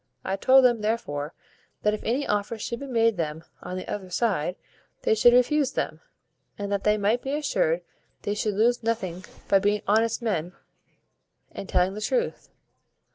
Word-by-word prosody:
I 190 Hz, -, 0 dB
told 260 Hz, +6 st, +5 dB
them, 240 Hz, -3 st, +3 dB
therefore, 160 Hz, -9 st, -2 dB, 0.5 s
that 210 Hz, -, +3 dB
if 215 Hz, -, -3 dB
any 260 Hz, +5 st, 0 dB
offers 210 Hz, +1 st, -2 dB
should 235 Hz, -, -4 dB
be 280 Hz, -, -7 dB
made 230 Hz, -4 st, +2 dB
them 160 Hz, -1 st, -3 dB, 0.2 s
on 185 Hz, -, -5 dB
the 185 Hz, -, -6 dB
other 190 Hz, -3 st, -5 dB
side, 180 Hz, -4 st, 0 dB, 0.5 s
they 460 Hz, -, +3 dB
should 245 Hz, -, +6 dB
refuse 270 Hz, +3 st, +3 dB
them, -, -, -3 dB, 0.6 s
and 200 Hz, 0 st, -4 dB
that 200 Hz, -1 st, -1 dB
they 210 Hz, 0 st, +3 dB
might 215 Hz, +4 st, +1 dB
be 270 Hz, -, -3 dB
assured 180 Hz, -, 0 dB, 0.4 s
they 205 Hz, -, -1 dB
should 210 Hz, -1 st, -1 dB
lose 240 Hz, +4 st, +3 dB
nothing 190 Hz, -6 st, -2 dB, 0.2 s
by 195 Hz, -, +5 dB
being 205 Hz, +1 st, +1 dB
honest 225 Hz, +2 st, +2 dB
men, 180 Hz, -6 st, -1 dB, 1.0 s
and 195 Hz, -, -8 dB
telling 180 Hz, +1 st, +2 dB
the 210 Hz, -, -6 dB
truth. 485 Hz, -, -1 dB
210 Hz, 175 wpm, -26 LUFS, 190-240 Hz, 1.0 s, should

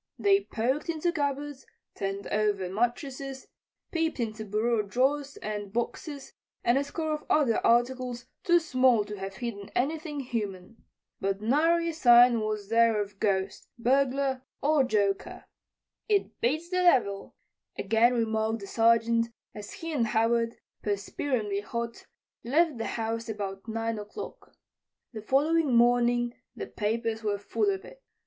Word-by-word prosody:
They 395 Hz, 0 st, +3 dB
poked 260 Hz, +8 st, -1 dB
into 335 Hz, +1 st, 0 dB
cupboards, 285 Hz, -2 st, -3 dB, 0.3 s
turned 195 Hz, 0 st, -3 dB
over 205 Hz, -3 st, 0 dB
mattresses, 265 Hz, +5 st, -2 dB, 0.5 s
peeped 325 Hz, -4 st, -1 dB
into 220 Hz, -2 st, -3 dB
bureau 215 Hz, +2 st, +1 dB
drawers 270 Hz, +7 st, 0 dB
and 205 Hz, -2 st, -4 dB
boxes 270 Hz, +5 st, -4 dB, 0.3 s
and 240 Hz, +3 st, +3 dB
a -, -, 0 dB
score 315 Hz, +2 st, -3 dB
of 300 Hz, -, -4 dB
other 270 Hz, -7 st, +3 dB
articles 245 Hz, +1 st, +1 dB, 0.2 s
too 345 Hz, -2 st, +5 dB
small 255 Hz, -8 st, +3 dB
to 210 Hz, 0 st, -6 dB
have 195 Hz, 0 st, -6 dB
hidden 205 Hz, -2 st, -5 dB
anything 300 Hz, +2 st, -1 dB
human. 220 Hz, -4 st, -5 dB, 0.4 s
But 195 Hz, 0 st, -1 dB
nary 325 Hz, +9 st, +2 dB
a -, -, -3 dB
sign 240 Hz, -5 st, +6 dB
was 215 Hz, -2 st, -3 dB
there 230 Hz, -1 st, +4 dB
of 200 Hz, -1 st, -5 dB
ghost, 195 Hz, -1 st, -1 dB
burglar 265 Hz, +2 st, +1 dB, 0.2 s
or 295 Hz, -1 st, +3 dB
joker. 205 Hz, -5 st, -1 dB, 0.6 s
"It 410 Hz, -2 st, 0 dB
beats 310 Hz, +8 st, 0 dB
the 365 Hz, -, 0 dB
devil," 255 Hz, -, +2 dB, 0.4 s
again 225 Hz, +4 st, +3 dB
remarked 220 Hz, -1 st, 0 dB
the -, -, -6 dB
Sergeant 230 Hz, +1 st, +3 dB, 0.3 s
as 210 Hz, -1 st, -8 dB
he 330 Hz, -1 st, -6 dB
and 240 Hz, -6 st, +1 dB
Howard, 230 Hz, +1 st, +1 dB, 0.3 s
perspiringly 205 Hz, +1 st, -2 dB
hot, 235 Hz, +2 st, -5 dB, 0.4 s
left 295 Hz, +1 st, +2 dB
the 225 Hz, -, -2 dB
house 225 Hz, 0 st, -3 dB
about 200 Hz, -1 st, -5 dB
9 225 Hz, 0 st, -2 dB
o'clock. 210 Hz, 0 st, -9 dB, 0.6 s
The 215 Hz, -, -6 dB
following 290 Hz, +3 st, +2 dB
morning 240 Hz, 0 st, +3 dB, 0.2 s
the -, -, -5 dB
papers 225 Hz, +1 st, -2 dB
were 205 Hz, -2 st, -1 dB
full 305 Hz, -, 0 dB
of 385 Hz, 0 st, -2 dB
it. -, -, -14 dB
235 Hz, 140 wpm, -28 LUFS, 215-280 Hz, 0.6 s, sign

